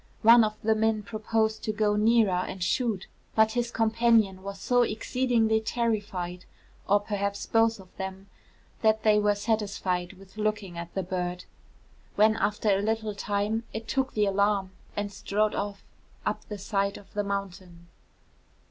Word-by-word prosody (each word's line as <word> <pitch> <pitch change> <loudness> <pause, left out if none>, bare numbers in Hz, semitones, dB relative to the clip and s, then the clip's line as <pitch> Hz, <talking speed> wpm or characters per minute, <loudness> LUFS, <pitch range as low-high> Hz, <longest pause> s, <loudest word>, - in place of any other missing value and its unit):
One 230 +1 +8
of 215 0 -1
the 220 +1 +4
men 220 -1 +1
proposed 220 0 -1
to 215 - 0
go 210 -1 +1
nearer 220 -1 +4
and 180 0 -2
shoot; 225 -3 0 0.3
but 220 0 +4
his 240 0 -1
companion 225 -4 +2
was 195 0 -7
so 245 +5 +2
exceedingly 225 -1 +1
terrified, 205 -6 -2 0.4
or 205 +1 +5
perhaps 200 -1 -3
both 225 -1 +2
of 185 -1 -16
them, 190 0 -6 0.6
that 220 -1 +3
they 210 -1 +5
were 210 0 +2
satisfied 200 -4 -1
with 195 +1 -17
looking 210 -4 -2
at 170 0 -6
the 190 - -1
bird; 180 0 -3 0.7
when 215 +1 +5
after 210 -1 0
a 195 0 +3
little 220 0 -1
time 205 +2 -1
it 220 0 -5
took 265 0 -1
the 210 -1 +3
alarm 200 -1 +1 0.3
and 205 0 -2
strode 210 +2 0
off 200 -1 -4 0.4
up - - -2
the 210 - -6
side 200 0 -1
of 200 - -16
the 205 - -1
mountain.' 185 -3 -5
210 Hz, 155 wpm, -27 LUFS, 195-220 Hz, 0.7 s, One